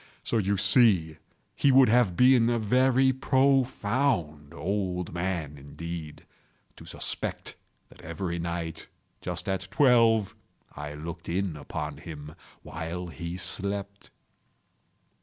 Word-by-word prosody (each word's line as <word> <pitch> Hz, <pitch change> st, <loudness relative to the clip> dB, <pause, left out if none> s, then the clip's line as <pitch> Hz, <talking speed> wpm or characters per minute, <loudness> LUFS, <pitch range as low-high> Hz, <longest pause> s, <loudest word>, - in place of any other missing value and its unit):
So 115 Hz, -, 0 dB
you 100 Hz, 0 st, 0 dB
see 95 Hz, -, +4 dB, 0.4 s
he 140 Hz, -, +3 dB
would 130 Hz, 0 st, +7 dB
have 110 Hz, -6 st, +3 dB
been 125 Hz, -2 st, +5 dB
a 120 Hz, -, +1 dB
very 130 Hz, +4 st, +3 dB
profound 130 Hz, -, +1 dB
old 90 Hz, +1 st, -3 dB
man, 85 Hz, -5 st, -3 dB
indeed, 80 Hz, +2 st, -8 dB, 0.5 s
to -, -, -12 dB
suspect -, -, -3 dB, 0.3 s
that -, -, -17 dB
every 85 Hz, +2 st, -4 dB
night, 85 Hz, -1 st, -4 dB, 0.3 s
just 90 Hz, +1 st, -4 dB
at 95 Hz, -1 st, -2 dB
twelve, 115 Hz, -3 st, +4 dB, 0.4 s
I 75 Hz, 0 st, -6 dB
looked 85 Hz, +3 st, -8 dB
in 90 Hz, -1 st, -1 dB
upon 75 Hz, 0 st, -6 dB
him 75 Hz, -1 st, -9 dB, 0.3 s
while 85 Hz, +2 st, -6 dB
he 85 Hz, +3 st, -6 dB
slept. 100 Hz, +2 st, -4 dB
90 Hz, 115 wpm, -27 LUFS, 80-115 Hz, 0.5 s, would